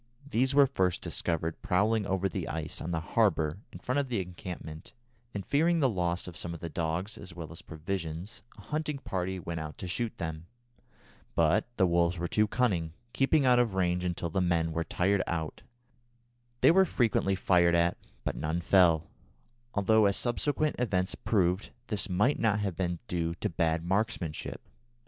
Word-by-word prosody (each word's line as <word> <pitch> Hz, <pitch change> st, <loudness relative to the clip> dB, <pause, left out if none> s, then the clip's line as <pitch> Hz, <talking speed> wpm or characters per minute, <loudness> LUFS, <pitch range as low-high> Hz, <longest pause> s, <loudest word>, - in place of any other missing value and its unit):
These 130 Hz, +1 st, +1 dB
were 140 Hz, -1 st, +8 dB
first 95 Hz, -10 st, 0 dB
discovered 80 Hz, -1 st, -2 dB
prowling 105 Hz, +3 st, +2 dB
over 95 Hz, 0 st, +1 dB
the 95 Hz, -, -4 dB
ice 80 Hz, 0 st, -4 dB
on 85 Hz, -, -4 dB
the 80 Hz, -2 st, -1 dB
harbour 95 Hz, -7 st, +2 dB
in -, -, -9 dB
front 130 Hz, +3 st, -1 dB
of 140 Hz, -, -1 dB
the 115 Hz, -4 st, 0 dB
encampment, 85 Hz, -3 st, -7 dB, 0.4 s
and, 100 Hz, -2 st, -5 dB
fearing 165 Hz, +4 st, +3 dB
the 140 Hz, -, +4 dB
loss 90 Hz, -6 st, -1 dB
of 90 Hz, -, -8 dB
some 85 Hz, +2 st, -4 dB
of -, -, -9 dB
the 85 Hz, +1 st, -6 dB
dogs, 85 Hz, +6 st, -2 dB
as 90 Hz, -3 st, -8 dB
well 85 Hz, -3 st, -7 dB
as 85 Hz, -, -10 dB
provisions, 85 Hz, +4 st, -5 dB, 0.2 s
a -, -, -11 dB
hunting 150 Hz, -1 st, -2 dB
party 95 Hz, -7 st, -3 dB
went 85 Hz, -1 st, -4 dB
out 80 Hz, -1 st, -6 dB
to 90 Hz, -, -6 dB
shoot 115 Hz, +5 st, -2 dB
them. 80 Hz, -2 st, -5 dB, 0.9 s
But 85 Hz, +8 st, +3 dB
the 95 Hz, -, +5 dB
wolves 85 Hz, 0 st, +2 dB
were 85 Hz, +1 st, -2 dB
too 105 Hz, +4 st, +2 dB
cunning, 95 Hz, -10 st, 0 dB, 0.2 s
keeping 135 Hz, +1 st, +3 dB
out 125 Hz, -1 st, +5 dB
of 115 Hz, -5 st, +1 dB
range 90 Hz, -1 st, +1 dB
until 85 Hz, -1 st, -2 dB
the 95 Hz, -, +1 dB
men 85 Hz, -2 st, +1 dB
were 85 Hz, +1 st, -1 dB
tired 95 Hz, +4 st, +1 dB
out. 80 Hz, -2 st, -3 dB, 1.0 s
They -, -, +7 dB
were 190 Hz, +3 st, +6 dB
frequently 110 Hz, -, +1 dB
fired 90 Hz, -2 st, +3 dB
at, 85 Hz, +1 st, +3 dB, 0.3 s
but -, -, -2 dB
none 80 Hz, +3 st, -1 dB
fell, 85 Hz, -3 st, +4 dB, 0.7 s
although, 105 Hz, +1 st, +4 dB
as 100 Hz, -, +1 dB
subsequent 145 Hz, +5 st, 0 dB
events 95 Hz, -6 st, 0 dB
proved, 95 Hz, -2 st, +1 dB, 0.2 s
this 105 Hz, -2 st, -1 dB
might 105 Hz, +10 st, +2 dB
not 105 Hz, -2 st, +2 dB
have 100 Hz, -4 st, -2 dB
been 90 Hz, -1 st, -1 dB
due 85 Hz, -1 st, -1 dB
to -, -, -2 dB
bad 80 Hz, -1 st, 0 dB
marksmanship. 95 Hz, -4 st, -2 dB
90 Hz, 180 wpm, -30 LUFS, 85-110 Hz, 1.0 s, were